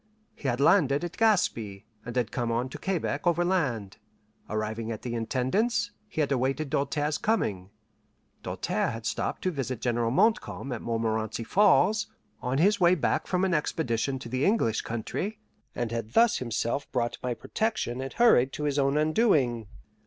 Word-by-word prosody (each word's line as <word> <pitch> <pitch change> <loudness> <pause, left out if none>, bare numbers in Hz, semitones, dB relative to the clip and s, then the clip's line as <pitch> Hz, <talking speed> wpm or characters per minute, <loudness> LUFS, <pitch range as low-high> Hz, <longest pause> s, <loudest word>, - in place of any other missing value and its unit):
He 140 - -6
had 120 0 0
landed 145 -1 +4
at 175 +1 -5
Gaspe, 120 - +1 0.2
and 120 +1 -7
had 125 -4 0
come 120 -1 -1
on 120 +3 -1
to - - -8
Quebec 185 -1 -2
overland. 165 - 0 0.5
Arriving 110 +1 -3
at 110 - -6
the 120 - -4
Intendance, 130 - 0 0.2
he 160 - -2
had 145 - 0
awaited 135 +2 0
Doltaire's 145 +2 0
coming. 100 - -1 0.7
Doltaire - - -1
had 115 0 -6
stopped - - -2
to 185 - +1
visit 130 -6 -3
General 120 -1 0
Montcalm 180 - +1
at 120 - -4
Montmorenci 115 -1 -2
Falls, 205 - +3 0.3
on 130 +1 -1
his 200 +6 +3
way 180 0 +5
back 160 - 0
from 185 0 +1
an 185 - 0
expedition 135 -5 -1
to 130 - -8
the 130 +3 -1
English 190 - +2
country, 175 - -4 0.4
and 120 -2 -2
had 115 -1 -4
thus 230 -1 +4
himself 120 +3 -2
brought 120 -2 -1
my 125 -1 -2
protection 205 - -2
and 135 0 -5
hurried 135 - +5
to 150 - -4
his 145 -1 0
own 140 +1 +2
undoing. 150 - +2
135 Hz, 165 wpm, -28 LUFS, 115-175 Hz, 0.7 s, way